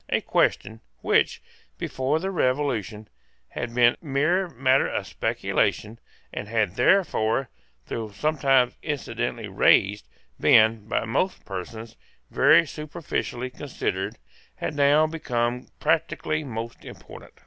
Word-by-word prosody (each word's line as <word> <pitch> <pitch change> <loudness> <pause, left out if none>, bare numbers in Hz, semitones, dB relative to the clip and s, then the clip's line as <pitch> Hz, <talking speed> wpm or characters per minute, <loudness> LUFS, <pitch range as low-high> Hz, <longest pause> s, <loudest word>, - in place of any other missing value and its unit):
A - - +2
question, 110 0 0 0.2
which, - - +1 0.3
before 135 +4 -1
the 190 +3 -3
Revolution, 125 - -1 0.4
had 120 -1 -5
been 120 -1 +5
mere 155 +6 +1
matter 130 -3 +2
of - - -3
speculation, 110 +2 -1 0.3
and - - -5
had 110 -4 0
therefore, 135 - +2 0.4
though 110 -2 -5
sometimes 135 +1 +2
incidentally 145 -4 -3
raised, 100 -7 +3 0.3
been, 110 -1 +4
by 110 - -1
most 180 - -1
persons, 110 +4 -7 0.3
very 155 +5 +5
superficially 145 -5 -4
considered, 135 +1 -4 0.4
had - - -4
now 145 +2 +4
become 125 -6 -2
practically 160 -1 0
most 115 -3 -6
important. - - -13
130 Hz, 110 wpm, -25 LUFS, 115-150 Hz, 0.4 s, been